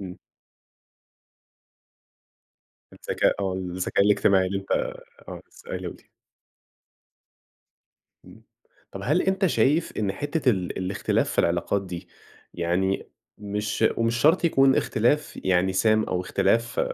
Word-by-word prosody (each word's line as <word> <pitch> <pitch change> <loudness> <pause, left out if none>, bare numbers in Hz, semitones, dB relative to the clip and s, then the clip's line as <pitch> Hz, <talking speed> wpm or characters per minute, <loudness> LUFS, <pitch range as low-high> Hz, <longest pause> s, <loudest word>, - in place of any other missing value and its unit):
إمم. 90 -2 -8 2.8
الذكاء - - 0
آه. 95 -2 -1
الذكاء 95 +1 -1
الاجتماعي 100 -2 +3
اللي 95 +1 -2
أنت 95 - -8 0.6
آه، - - -8
لسّه 475 - -17
قايله - - -4
لي. - - -16 2.2
إمم. - - -16 0.5
طب - - -7
هل - - +2
أنت 190 0 +1
شايف 155 0 +1
إن 105 -3 0
حتّة 145 +4 -1
ال 95 -5 -2
الاختلاف 95 +1 -1
في - - -1
العلاقات 85 +3 +1
دي 90 -2 -7 0.5
يعني 90 +3 -1 0.3
مش 105 +2 -3
ومش 115 0 +1
شرط 155 +9 +3
يكون 135 -4 +4
اختلاف 120 +7 0
يعني 95 0 +2
سام 110 +2 +3
أو 90 -3 -2
اختلاف 115 +5 0
100 Hz, 115 wpm, -25 LUFS, 95-120 Hz, 2.8 s, يكون